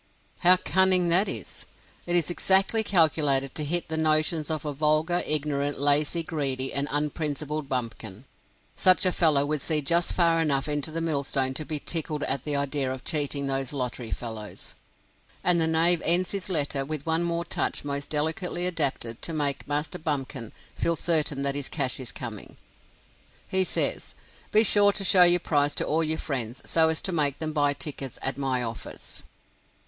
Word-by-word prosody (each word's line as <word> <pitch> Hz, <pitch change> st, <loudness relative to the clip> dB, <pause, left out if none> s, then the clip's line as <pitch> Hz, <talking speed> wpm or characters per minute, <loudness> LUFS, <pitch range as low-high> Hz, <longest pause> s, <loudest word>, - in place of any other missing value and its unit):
How 180 Hz, +1 st, +7 dB
cunning 185 Hz, -1 st, +2 dB
that 185 Hz, +5 st, +4 dB
is! -, -, -6 dB, 0.4 s
It 175 Hz, -, 0 dB
is 170 Hz, -2 st, +1 dB
exactly 195 Hz, +5 st, +3 dB
calculated 150 Hz, -8 st, +2 dB
to 155 Hz, -, -3 dB
hit 170 Hz, +3 st, +1 dB
the 160 Hz, -, -1 dB
notions 155 Hz, 0 st, +2 dB
of 155 Hz, -1 st, -3 dB
a 150 Hz, -, -3 dB
vulgar, 155 Hz, +4 st, +1 dB
ignorant, 145 Hz, -1 st, +1 dB
lazy, 145 Hz, +4 st, +4 dB
greedy, 135 Hz, -5 st, -2 dB
and 140 Hz, +1 st, 0 dB
unprincipled 150 Hz, 0 st, -3 dB
bumpkin. 115 Hz, -3 st, -4 dB, 0.5 s
Such 185 Hz, +1 st, +4 dB
a 185 Hz, -, +4 dB
fellow 155 Hz, -5 st, +2 dB
would 150 Hz, -1 st, -2 dB
see 155 Hz, +1 st, +1 dB
just 170 Hz, +4 st, +2 dB
far 165 Hz, -2 st, +2 dB
enough 140 Hz, -3 st, 0 dB
into 145 Hz, 0 st, -2 dB
the 165 Hz, +1 st, -4 dB
millstone 140 Hz, -4 st, 0 dB
to 155 Hz, +3 st, -5 dB
be 155 Hz, -1 st, -2 dB
tickled 155 Hz, -2 st, -3 dB
at 135 Hz, -, -1 dB
the 150 Hz, -1 st, -1 dB
idea 140 Hz, -1 st, -1 dB
of 130 Hz, 0 st, -7 dB
cheating 145 Hz, -3 st, 0 dB
those 135 Hz, 0 st, -2 dB
lottery 125 Hz, -3 st, -4 dB
fellows. 110 Hz, -3 st, -7 dB, 0.7 s
And 175 Hz, -2 st, +4 dB
the 160 Hz, -, +2 dB
knave 165 Hz, +1 st, +3 dB
ends 175 Hz, +2 st, +3 dB
his 200 Hz, -1 st, -2 dB
letter 145 Hz, -5 st, -1 dB
with 150 Hz, 0 st, -5 dB
one 160 Hz, 0 st, +1 dB
more 170 Hz, 0 st, -1 dB
touch -, -, -2 dB
most 140 Hz, 0 st, -4 dB
delicately 160 Hz, +4 st, -2 dB
adapted 140 Hz, -9 st, -3 dB
to 165 Hz, -, -4 dB
make 145 Hz, -3 st, -2 dB
Master 150 Hz, +5 st, -3 dB
Bumpkin 135 Hz, -6 st, -4 dB, 0.2 s
feel 170 Hz, -, 0 dB
certain 155 Hz, -4 st, +1 dB
that 140 Hz, 0 st, -1 dB
his 145 Hz, -1 st, -4 dB
cash 135 Hz, -4 st, -2 dB
is 130 Hz, -, -6 dB
coming. -, -, -8 dB, 0.9 s
He 190 Hz, 0 st, +1 dB
says, -, -, -2 dB, 0.4 s
"Be 215 Hz, -, +4 dB
sure 205 Hz, -1 st, +4 dB
to 195 Hz, -, -1 dB
show 185 Hz, -1 st, +5 dB
your 175 Hz, 0 st, +4 dB
prize 145 Hz, -3 st, 0 dB
to -, -, -2 dB
all 160 Hz, +2 st, 0 dB
your 160 Hz, 0 st, -1 dB
friends, 125 Hz, -6 st, -4 dB
so 160 Hz, -1 st, +2 dB
as 160 Hz, -, -2 dB
to 190 Hz, -, +1 dB
make 145 Hz, -5 st, 0 dB
them 155 Hz, -1 st, -4 dB
buy 145 Hz, -1 st, +2 dB
tickets 140 Hz, -3 st, -6 dB
at 135 Hz, -, 0 dB
my 130 Hz, -2 st, -1 dB
office." 115 Hz, -1 st, -8 dB
150 Hz, 180 wpm, -26 LUFS, 140-170 Hz, 0.9 s, How